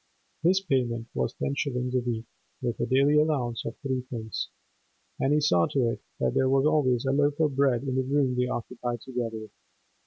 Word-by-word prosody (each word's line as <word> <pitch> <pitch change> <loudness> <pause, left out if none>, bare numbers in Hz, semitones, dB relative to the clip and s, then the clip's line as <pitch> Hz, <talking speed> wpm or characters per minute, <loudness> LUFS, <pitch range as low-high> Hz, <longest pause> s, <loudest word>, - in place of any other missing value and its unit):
His 185 +4 +3
payment 120 -9 0
was 65 -1 -1
ten 140 - -2
shillings 125 -3 -2
a 130 - +3
week 120 -2 -3 0.3
(with 120 -3 -3
a - - 0
daily 140 +3 +4
allowance 135 -7 0
of - - -5
three 130 -2 -1
pints), 110 -4 -4 0.7
and 135 - +2
he 150 - +4
saw 90 - +3
to 125 -4 +1
it - - -6 0.2
that 65 - +1
there 130 0 +2
was 135 +1 +3
always 135 -5 +2
a 135 - +2
loaf 145 +1 +2
of 150 -4 +2
bread 135 -3 +2
in 135 -2 -2
the 130 - +2
room 135 -1 +1
they 125 0 +1
occupied 120 -1 -4
together. 115 -4 -4
130 Hz, 195 wpm, -27 LUFS, 120-140 Hz, 0.7 s, daily